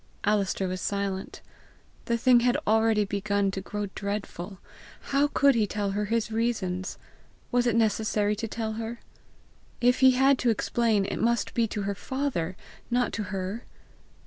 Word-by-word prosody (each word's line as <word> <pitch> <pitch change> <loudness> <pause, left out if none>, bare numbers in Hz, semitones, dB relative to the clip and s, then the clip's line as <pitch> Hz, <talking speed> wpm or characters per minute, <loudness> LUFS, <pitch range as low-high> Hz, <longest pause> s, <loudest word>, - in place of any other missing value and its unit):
Alister 200 -2 +1
was 185 0 -4
silent. 200 -1 -3 0.6
The 235 - +1
thing 245 +1 +5
had 245 +1 +2
already 220 -1 +3
begun 200 0 0
to 195 - -4
grow 205 +1 -4
dreadful! 200 -2 -5 0.5
How 280 +1 +4
could 280 -1 +4
he 220 -3 +1
tell 205 0 -2
her 210 +1 -1
his 225 +1 -1
reasons! 210 -5 -1 0.5
Was 245 0 +2
it 235 - +2
necessary 215 -1 +1
to 225 +2 -3
tell 220 0 -3
her? 230 +1 -5 0.8
If 245 +1 +3
he 260 -1 +7
had 270 0 +4
to 245 - +2
explain, 225 -2 +1
it - - -3
must 235 -1 +1
be 230 -1 +2
to 210 -1 -4
her 200 +1 -1
father, 200 -7 -3 0.3
not 245 -1 +1
to 210 - -2
her! 195 +4 -4
215 Hz, 160 wpm, -27 LUFS, 200-235 Hz, 0.8 s, he